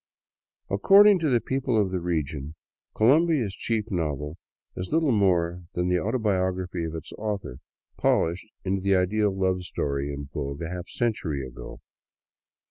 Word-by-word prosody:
According 195 - +6
to 160 -3 +1
the 120 -3 +3
people 130 0 0
of 100 -3 +1
the 95 - -1
region, 80 -3 -3 0.4
Colombia's 135 - +3
chief 110 0 -2
novel 75 -2 -2 0.4
is 90 - -5
little 160 -2 +3
more 90 -5 +2
than 90 +1 0
the 90 0 +2
autobiography 95 -4 -1
of 80 0 -5
its 80 - -7
author, 100 - -4 0.4
polished 85 +5 +1 0.2
into 95 0 0
the 100 0 +3
ideal 100 +3 +2
love 95 -1 0
story 70 -4 -2
in 70 0 -6
vogue 70 +2 -4
a 80 - -4
half 90 0 -6
century 80 - -2
ago. 60 -2 -10
95 Hz, 145 wpm, -26 LUFS, 80-110 Hz, 0.4 s, According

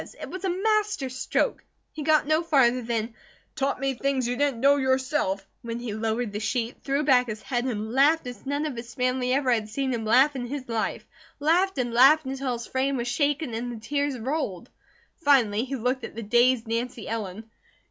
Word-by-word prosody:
It - - -7
was 370 0 -7
a 380 - 0
master 410 -5 0
stroke. 255 +1 -1 0.3
He 310 - -7
got 305 0 +3
no 310 +2 +2
farther 265 -7 +3
than 230 -1 -2 0.4
"taught 275 -3 -1
me 270 0 0
things 265 -1 -1
you 245 - -1
didn't 280 -3 0
know 280 +3 +5
yourself," 260 -7 0 0.2
when 230 0 -5
he 240 -3 -5
lowered 220 0 -2
the 205 - -3
sheet, 230 +2 -2
threw 275 +2 0
back 255 -4 +4
his 215 -1 -6
head 245 -2 -1
and 220 -3 -3
laughed 290 +4 +4
as 245 -1 -8
none 285 +2 -2
of 295 -4 -3
his 235 -1 -8
family 250 0 0
ever 265 -1 +2
had 220 -3 0
seen 265 +3 -1
him 230 -2 -2
laugh 260 +6 +4
in 245 -2 -4
his 270 0 -5
life; 225 -2 -2 0.3
laughed 350 +5 +2
and 240 -2 -1
laughed 275 +5 +6
until 265 -1 -2
his 235 -1 -5
frame 265 +1 -1
was 240 0 -3
shaken 285 0 0
and 240 +2 -3
the 230 - -7
tears 285 +3 -1
rolled. 245 - -3 0.5
Finally 250 - +3
he 270 +1 -4
looked 250 +1 -1
at - - -7
the 230 - -5
dazed 240 +2 +3
Nancy 230 0 -3
Ellen. 215 -2 -4
255 Hz, 205 wpm, -26 LUFS, 230-285 Hz, 0.5 s, laughed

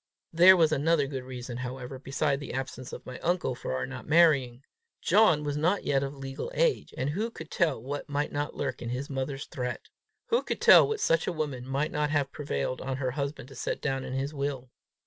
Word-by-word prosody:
There 180 +3 +8
was 160 -2 +4
another 155 0 +2
good 135 -2 -5
reason, 125 -1 -7
however, 130 +1 -6
besides 140 +1 0
the 145 - -7
absence 130 -1 -5
of - - -8
my 125 - -8
uncle, 175 -6 0
for 95 - -4
our 65 - -1
not - - -8
marrying: 140 -6 +4 0.4
John 185 -9 +4
was 145 -1 -2
not 175 +7 +1
yet 140 -1 +1
of 140 +1 -4
legal 135 - -6
age, - - +1
and 135 +3 -1
who 210 +9 -1
could - - -10
tell 165 - +1
what 140 +5 -5
might 145 +1 -1
not 145 +1 -3
lurk - - -3
in 120 - -4
his 130 +4 -4
mother's 135 +1 -3
threat! 125 -2 -5 0.4
Who 475 +1 +3
could - - -4
tell - - +8
what 440 -1 -2
such 165 0 +2
a - - +1
woman 145 -6 -4
might 140 +4 -1
not 150 0 0
have 145 -2 0
prevailed 130 - -3
on 130 0 -3
her 130 -2 -1
husband 140 -1 -4
to 135 - -12
set 125 - -3
down 135 -2 -2
in 130 - -5
his 135 +3 -2
will! 140 -3 -3
140 Hz, 220 wpm, -28 LUFS, 130-155 Hz, 0.4 s, There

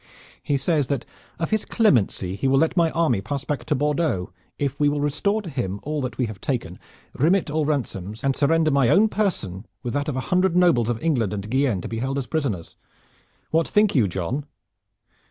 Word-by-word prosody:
He 145 -2 0
says 145 0 +1
that 140 0 -2 0.3
of 165 +4 -3
his 215 -1 +1
clemency 110 - +2
he 100 - -1
will 135 +1 +4
let 160 +5 +2
my 170 -2 +4
army 160 -11 +1
pass 140 +6 -4
back 140 -5 -3
to 150 - +1
Bordeaux 145 - 0 0.3
if 140 -1 -2
we 145 -1 +4
will 145 0 -1
restore 175 +9 0
to 175 - -6
him 100 -8 -3
all 150 0 -2
that 130 -1 -4
we 125 - +1
have 105 -3 -8
taken, 120 -9 -3 0.3
remit 165 +2 +2
all 155 0 +1
ransoms, 110 -8 -3
and 135 -1 +1
surrender 155 +2 +3
my 140 -4 +3
own 210 - +5
person 110 - -1 0.2
with 120 - -3
that 145 +1 -1
of 140 - -3
a - - -1
hundred 185 -1 +3
nobles 170 -11 +4
of 120 -2 -1
England 120 - +1
and 105 +2 -6
Guienne 130 -8 +1
to - - -5
be 115 - -4
held 135 +3 -2
as 135 - -2
prisoners. 125 - -3 0.7
What 165 0 +2
think 210 0 +3
you, 120 -8 +3
John?" 95 - -3
140 Hz, 210 wpm, -23 LUFS, 115-160 Hz, 0.7 s, own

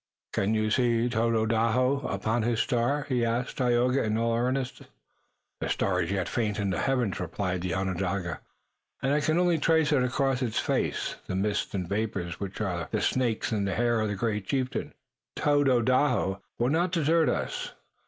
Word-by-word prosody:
"Can 100 +3 +1
you 110 0 +1
see 120 -1 +2
Tododaho 115 +3 +2
upon 115 +2 -1
his 115 0 0
star?" 125 +6 +1
he 125 -3 +1
asked 120 +2 -1
Tayoga 125 +1 +2
in 110 0 0
all 115 0 +1
earnestness. 125 +2 -2 0.7
"The - - -3
star 95 -1 +1
is 85 - -2
yet 95 -3 -1
faint 110 -3 -1
in 100 -2 0
the 85 - -1
heavens," 125 -7 0
replied 90 +1 -2
the 90 0 -2
Onondaga, 95 -2 -2 0.6
"and 135 +2 +2
I 150 - +3
can 155 +2 +1
only 175 -2 +3
trace 160 0 +3
across 130 -1 +1
its 120 -4 -1
face - - -1
the 95 - -3
mists 100 +1 -1
and 90 -3 -2
vapors 100 -4 -2
which 100 -1 -5
are 85 -6 -2
the - - -1
snakes 120 -4 0
in 105 -3 0
the 100 -2 -1
hair 120 -1 +2
of 110 - 0
the 105 - -2
great 105 -1 -2
chieftain, 130 -2 -2 0.4
but - - -6
Tododaho 130 -7 +2 0.2
will 120 +1 +1
not 170 +4 +1
desert 165 -1 +3
us. - - -3
115 Hz, 175 wpm, -28 LUFS, 100-130 Hz, 0.7 s, I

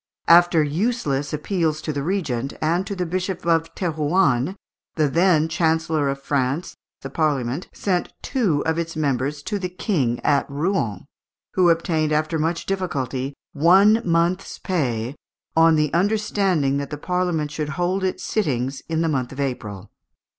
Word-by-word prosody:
After 170 -1 +6
useless 150 - -1
appeals 155 0 -1
to 155 - -2
the 140 - -2
Regent, 140 -7 -2
and 170 +5 0
to 200 - -3
the 180 -1 -2
Bishop 185 +1 -3
of 165 -1 +1
Thérouanne, 155 -3 +1 0.4
the 155 -2 +2
then 165 +1 +3
Chancellor 160 -2 +1
of 135 0 -3
France, 140 +4 -1 0.3
the 135 - -5
Parliament 140 -1 -1
sent 180 -3 -1
two 200 - 0
of 160 +1 0
its 165 -1 -4
members 145 -1 -1
to 205 +4 -2
the 180 -1 -3
King 150 - -1
at 145 -1 +2
Rouen, 140 - -1 0.5
who 180 -2 +4
obtained, 160 -2 +1
after 155 +1 0
much 165 +2 -1
difficulty, 140 -8 -2 0.2
"one 195 +9 +5
month's 170 +3 0
pay, 125 - -1 0.4
on 165 0 +6
the 150 -2 +1
understanding 190 -6 +1
that 140 -1 -3
the 150 - -5
Parliament 175 -2 -1
should 150 -1 -3
hold 180 +2 0
its 185 - -2
sittings 135 - -1
in 160 0 0
the 165 - +1
month 130 -5 -1
of 135 - -9
April." 105 -8 -4
160 Hz, 155 wpm, -22 LUFS, 140-180 Hz, 0.5 s, After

